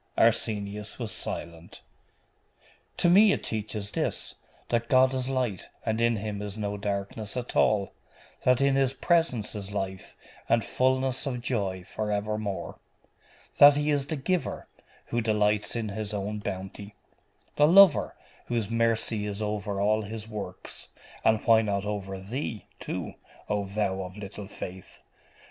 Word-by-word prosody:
Arsenius 105 Hz, -2 st, +1 dB
was 115 Hz, -4 st, -3 dB
silent. 85 Hz, 0 st, -5 dB, 1.1 s
'To -, -, +3 dB
me 200 Hz, +4 st, +7 dB
it -, -, -3 dB
teaches 105 Hz, -1 st, -3 dB
this: -, -, -2 dB, 0.4 s
that 115 Hz, -1 st, 0 dB
God 130 Hz, 0 st, +5 dB
is 130 Hz, 0 st, -1 dB
light, 125 Hz, -8 st, -2 dB, 0.2 s
and 110 Hz, 0 st, 0 dB
in 115 Hz, 0 st, +3 dB
Him 105 Hz, -1 st, -4 dB
is 105 Hz, 0 st, -6 dB
no 105 Hz, -1 st, -2 dB
darkness 100 Hz, +2 st, -3 dB
at 125 Hz, -1 st, -4 dB
all. 100 Hz, -3 st, +3 dB, 0.5 s
That 125 Hz, 0 st, +3 dB
in 140 Hz, 0 st, +4 dB
His 135 Hz, -1 st, +2 dB
presence 160 Hz, -, +1 dB
is 100 Hz, -2 st, -6 dB
life, 95 Hz, -2 st, -5 dB, 0.3 s
and 115 Hz, -3 st, +3 dB
fulness 130 Hz, +2 st, +1 dB
of 125 Hz, -2 st, -2 dB
joy 95 Hz, -7 st, -1 dB
for 105 Hz, +3 st, -3 dB
evermore. 105 Hz, -1 st, -3 dB, 0.8 s
That 145 Hz, 0 st, +10 dB
He 150 Hz, +1 st, +1 dB
is 140 Hz, -1 st, 0 dB
the 155 Hz, -, -2 dB
giver, 175 Hz, +5 st, -2 dB, 0.4 s
who 120 Hz, -, 0 dB
delights 105 Hz, -1 st, +1 dB
in 115 Hz, -2 st, -2 dB
His 105 Hz, 0 st, -4 dB
own 105 Hz, +1 st, -3 dB
bounty; 100 Hz, +1 st, -6 dB, 0.6 s
the 150 Hz, -, +6 dB
lover, 190 Hz, -1 st, +7 dB, 0.3 s
whose 115 Hz, -3 st, -1 dB
mercy 115 Hz, -2 st, +1 dB
is 100 Hz, 0 st, -4 dB
over 105 Hz, -1 st, -2 dB
all 105 Hz, +2 st, +2 dB
His 110 Hz, +1 st, -6 dB
works 100 Hz, -4 st, -7 dB, 0.4 s
and 110 Hz, -1 st, +3 dB
why 115 Hz, -1 st, +6 dB
not 100 Hz, -2 st, -1 dB
over 100 Hz, -2 st, -4 dB
thee, 110 Hz, +2 st, -4 dB
too, -, -, -4 dB, 0.3 s
O 105 Hz, -1 st, -1 dB
thou 100 Hz, -1 st, -1 dB
of 90 Hz, +1 st, -7 dB
little 100 Hz, 0 st, -7 dB
faith? 95 Hz, -2 st, -9 dB
105 Hz, 150 wpm, -28 LUFS, 100-120 Hz, 1.1 s, That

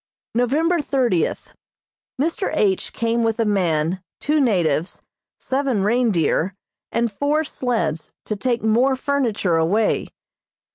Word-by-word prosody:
November 300 Hz, +8 st, +2 dB
thirtieth: 245 Hz, -, 0 dB, 0.7 s
Mr. 330 Hz, +6 st, 0 dB
H. 195 Hz, -8 st, +1 dB
came 230 Hz, 0 st, 0 dB
with 225 Hz, 0 st, 0 dB
a 230 Hz, -, +2 dB
man, 180 Hz, -3 st, 0 dB, 0.2 s
two 300 Hz, +1 st, +1 dB
natives, 175 Hz, -, 0 dB, 0.4 s
seven 265 Hz, -6 st, 0 dB
reindeer 200 Hz, -5 st, +1 dB, 0.4 s
and 235 Hz, -1 st, 0 dB
four 290 Hz, +8 st, 0 dB
sleds 180 Hz, -, -2 dB
to 215 Hz, -, -2 dB
take 235 Hz, +2 st, -1 dB
more 240 Hz, +5 st, +3 dB
furniture 250 Hz, -11 st, 0 dB
away. 195 Hz, +7 st, +1 dB
230 Hz, 110 wpm, -21 LUFS, 190-265 Hz, 0.7 s, more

